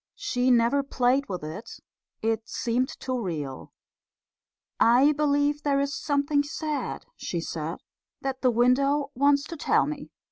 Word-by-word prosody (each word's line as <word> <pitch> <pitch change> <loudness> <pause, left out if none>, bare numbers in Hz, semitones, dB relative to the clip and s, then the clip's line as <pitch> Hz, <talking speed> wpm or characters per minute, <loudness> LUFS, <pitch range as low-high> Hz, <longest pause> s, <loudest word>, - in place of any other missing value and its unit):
She 250 0 0
never 240 +3 +4
played 265 -1 +1
with 180 -4 -4
it. 160 +9 -7 0.5
It 225 0 -1
seemed 245 +2 0
too 255 -2 -2
real. 150 - -5 1.1
"I 250 +6 +6
believe 290 0 +1
there's 280 -1 +1
something 285 0 +1
sad," 300 +1 -4
she 175 - -4
said, 165 0 -4 0.4
"that 265 -1 -4
the 255 - +4
window 275 +4 +2
wants 280 +2 +3
to 335 +2 -7
tell - - +2
me." 295 -1 -6
270 Hz, 135 wpm, -26 LUFS, 230-285 Hz, 1.1 s, I